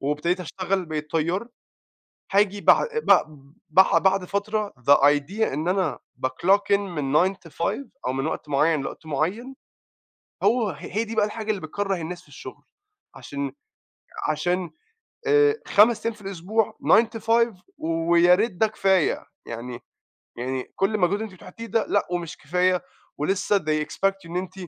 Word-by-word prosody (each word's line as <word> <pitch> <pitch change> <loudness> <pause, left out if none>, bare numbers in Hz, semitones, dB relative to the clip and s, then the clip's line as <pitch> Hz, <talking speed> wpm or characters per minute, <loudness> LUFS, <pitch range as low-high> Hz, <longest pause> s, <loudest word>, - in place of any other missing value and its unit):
وابتديت 150 +6 -1
أشتغل 185 +2 -2
بقيت 155 -1 -5
طيار، 170 +8 -1 0.8
هاجي 200 0 +2
بع - - +5 0.2
بع - - +6 0.5
بع 190 +5 +5
بعد 190 -1 +2
فترة 205 +2 -2
the 140 +4 +6
idea 145 +9 +2
إن 155 +4 -2
أنا 185 -5 0 0.3
بclock 195 +10 +2
in - - +1
من 155 -9 -3
09:00 195 +1 -1
to 160 - -15
17:00 240 +10 -2 0.2
أو 130 - 0
من 135 +1 -2
وقت 150 - -5
معيّن 150 +1 +2
لوقت 160 - -7
معيّن، 185 - -2 0.9
هو 235 -4 +3
ه - - -4
هي 205 +6 -2
دي 225 - -6
بقى 215 -1 +3
الحاجة 215 +1 -6
اللي 200 - -4
بتكرَّه 195 +5 -2
الناس 175 +1 -6
في - - -24
الشغل، - - -11 0.5
عشان 140 -1 -5 0.8
عشان، 175 +2 -1 0.6
آآ 435 0 +4
5 220 +3 +4
أيام 230 - 0
في 210 - -17
الأسبوع 195 +3 -2
09:00 230 - +7
to - - -15
17:00 230 0 +3 0.2
وياريت 170 +6 +3
ده 200 +5 +2
كفاية، 190 -5 +1 0.2
يعني 120 +1 -7 0.6
يعني 130 +1 -3
كلّ 195 +3 +1
مجهود 200 +4 +2
أنتِ 220 -3 -6
بتحطيه 185 +5 -10
ده 225 0 0
لأ 205 - +1
ومش 175 -2 -3
كفاية، 180 +4 +1 0.3
ولسّه 195 +6 +1
they 155 -1 -1
expect 195 +4 0
إن 170 +2 -4
أنتِ 185 0 -4
185 Hz, 160 wpm, -24 LUFS, 155-205 Hz, 0.9 s, 09:00